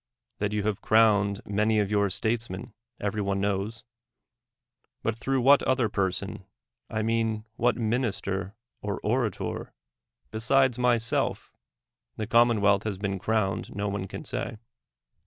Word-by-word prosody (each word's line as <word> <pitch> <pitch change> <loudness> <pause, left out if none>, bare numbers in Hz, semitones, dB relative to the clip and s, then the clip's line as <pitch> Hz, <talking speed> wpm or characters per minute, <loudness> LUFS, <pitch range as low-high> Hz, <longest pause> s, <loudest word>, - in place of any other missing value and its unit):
That 105 -1 0
you 105 -1 -1
have 105 0 -1
crowned 105 -2 +4
many 105 +2 +1
of 105 -1 +1
your 100 -1 +2
statesmen, 110 -1 -2 0.3
every 105 +1 -1
one 100 -1 0
knowB; 100 +4 -2 1.2
but 110 - 0
through 135 +3 0
what 140 +3 +6
other 130 -4 +1
person 95 0 -2 0.5
(I 110 0 -1
mean 115 -1 0
what 120 +2 +2
minister 110 -4 -1 0.3
or 100 -1 -3
orator), 115 +1 -2 0.6
besides 125 +3 +2
myself, 120 -2 +1 0.6
the 110 - -2
commonwealth 110 -4 +4
has 105 -3 -3
been 100 -1 -2
crowned, 105 -1 -1
no 100 0 -1
one 100 -1 -3
can - - -8
say. 110 -1 -4
110 Hz, 130 wpm, -27 LUFS, 100-115 Hz, 1.2 s, what